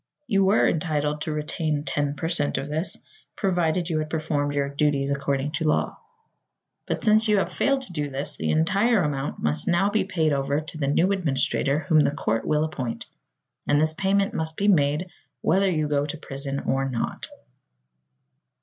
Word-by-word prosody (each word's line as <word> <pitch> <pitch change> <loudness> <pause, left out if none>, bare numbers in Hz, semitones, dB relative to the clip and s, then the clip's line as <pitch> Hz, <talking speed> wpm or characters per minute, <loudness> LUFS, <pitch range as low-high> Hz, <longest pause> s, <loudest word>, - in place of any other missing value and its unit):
You 195 -6 +2
were 195 +3 +4
entitled 150 -2 -1
to 155 - -2
retain 150 0 -2
ten 145 -2 -1
per 155 +3 -3
cent 160 -4 0
of 140 - -4
this, 155 +4 -1 0.4
provided 175 -3 0
you 160 -3 0
had 155 0 -3
performed 145 -2 -1
your 140 -1 +1
duties 140 -1 0
according 140 0 -1
to 160 +1 -1
law; 150 - 0 0.9
but - - -2
since 215 +1 +4
you 210 -1 +4
have 195 - 0
failed 275 -1 +1
to 190 - -10
do 150 -3 -2
this 140 +1 -4
the - - -2
entire 195 +7 +3
amount 145 -2 -3
must 75 0 -1
now 195 +4 +2
be 215 - +2
paid 165 -5 0
over 140 +1 0
to 155 +1 -7
the 140 - 0
new 170 +7 +3
administrator 145 -4 0
whom 160 -3 +3
the - - +4
court 115 -5 -2
will 150 0 +2
appoint. 130 -7 -4 0.6
And 145 - +3
this 155 +1 +2
payment 195 +3 +1
must 160 0 -2
be 200 - +1
made 150 -3 +3 0.4
whether 195 +2 +3
you 155 -4 0
go 145 0 0
to 150 - -5
prison 140 -1 -5
or 135 0 0
not." 120 -3 -3
155 Hz, 185 wpm, -25 LUFS, 145-180 Hz, 0.9 s, were